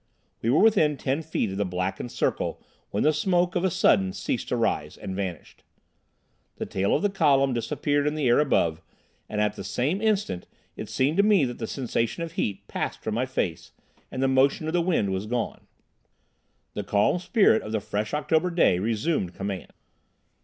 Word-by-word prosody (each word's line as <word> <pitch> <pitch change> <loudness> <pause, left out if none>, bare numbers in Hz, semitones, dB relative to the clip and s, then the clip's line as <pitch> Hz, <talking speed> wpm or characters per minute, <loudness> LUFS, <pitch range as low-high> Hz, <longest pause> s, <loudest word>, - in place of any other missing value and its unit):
We 115 - 0
were 135 - +4
within 175 -10 +4
ten 135 +4 -1
feet 155 -10 -2
of 95 - -5
the 100 - +1
blackened 90 +5 -3
circle - - -1 0.3
when 100 - -1
the 155 - +4
smoke 175 +3 +1
of 175 - +1
a 190 - +3
sudden 95 - +3
ceased - - -3
to - - -1
rise, - - -1
and 95 - -6
vanished. 95 -4 -6 0.9
The - - -4
tail 100 +1 0
of - - -1
the 205 - +3
column 140 -7 +3
disappeared 145 +5 0
in 150 - 0
the 150 -4 0
air 120 - +5
above, 85 - +1 0.5
and 105 - -3
at 105 0 +1
the - - -7
same 130 - -1
instant 210 - 0 0.3
it - - -7
seemed 140 +6 +1
to - - +7
me 205 -8 +4
that 120 -1 -5
the 115 - -3
sensation 125 +3 -2
of 165 - -5
heat 105 - -3
passed - - -4
from 110 - -2
my 125 +4 0
face, 90 -10 -3 0.4
and 130 - -3
the - - +3
motion 135 +4 +3
of 160 - -2
the 175 - +3
wind 165 - +1
was 95 +2 -3
gone. 120 +1 -3 1.1
The - - -3
calm 105 +12 +2
spirit 190 - +3
of 110 - -7
the 110 - 0
fresh 105 +1 -3
October 160 +3 +1
day 170 - +3
resumed 110 - -1
command. 95 -2 -5
130 Hz, 195 wpm, -26 LUFS, 105-160 Hz, 1.1 s, to